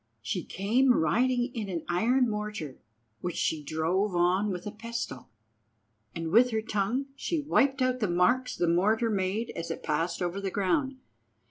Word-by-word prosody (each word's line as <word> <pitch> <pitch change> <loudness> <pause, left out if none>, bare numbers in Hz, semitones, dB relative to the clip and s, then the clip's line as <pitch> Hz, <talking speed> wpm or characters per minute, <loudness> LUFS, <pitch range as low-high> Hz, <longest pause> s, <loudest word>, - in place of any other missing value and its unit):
She 175 - -2
came 245 +6 +2
riding 245 - +1
in 215 -5 -4
an 170 -4 -4
iron 240 +9 +2
mortar, 210 - -4 0.4
which 175 -2 -4
she 155 -2 -1
drove 175 +6 0
on 180 +4 +2
with 180 -2 -4
a 210 - -4
pestle, 225 - -6 0.9
and 165 -1 -3
with 240 +4 +6
her 220 -2 -1
tongue 215 +6 -1
she 325 +3 -2
wiped 280 -2 +2
out 255 0 +1
the 210 -5 0
marks 235 +9 +2
the 175 - 0
mortar 215 +7 +2
made 200 +3 -1
as 165 0 -6
it - - -5
passed 165 +3 -1
over 180 +2 -2
the 195 - -2
ground. 265 - 0
205 Hz, 165 wpm, -28 LUFS, 175-245 Hz, 0.9 s, with